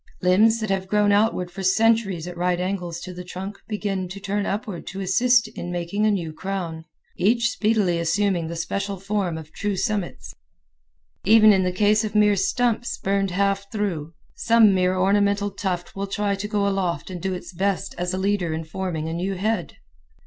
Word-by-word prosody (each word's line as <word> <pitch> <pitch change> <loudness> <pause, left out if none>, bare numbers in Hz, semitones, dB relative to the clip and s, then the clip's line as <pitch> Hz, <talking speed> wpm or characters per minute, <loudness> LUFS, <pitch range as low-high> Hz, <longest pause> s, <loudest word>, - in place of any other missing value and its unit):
Limbs 215 +5 +4
that 215 -2 -2
have 190 -1 -1
grown 210 +1 +3
outward 205 -4 +2
for 195 - -7
centuries 195 -2 +2
at 180 - -7
right 175 0 0
angles 180 -2 -3
to 185 - -7
the 180 0 -7
trunk 190 +3 -7
begin 200 -3 -2
to 190 +3 -8
turn 200 +1 -2
upward 205 -3 -4
to 195 - -6
assist 230 +5 +3
in 175 -5 -6
making 175 +5 -1
a - - +3
new 170 -6 -2
crown, 170 -3 -4 0.3
each 235 +5 +3
speedily 210 -7 +1
assuming 170 0 +1
the 170 - -5
special 200 +4 -3
form 195 -4 -2
of 160 -1 -10
true 205 +3 -2
summits. 205 -2 -3 0.9
Even 215 +1 +7
in 190 - +3
the 180 0 0
case 210 +3 +3
of 215 -1 -4
mere 210 -1 +5
stumps, 235 +4 0
burned 195 0 0
half 200 +2 0
through, 170 -8 -3 0.2
some 225 -3 +5
mere 185 0 +2
ornamental 200 +1 +2
tuft 185 -3 -4
will 200 0 -3
try 205 +1 -1
to 200 +1 -3
go 205 -1 0
aloft 185 -4 -1
and 180 -2 -6
do 190 -1 -1
its 180 - -9
best 195 +2 -1
as 180 0 -1
a 185 - -2
leader 190 -4 0
in 160 - -4
forming 160 -1 -4
a 160 - -3
new 185 +3 -2
head. 200 -1 -2
195 Hz, 190 wpm, -23 LUFS, 180-205 Hz, 0.9 s, Even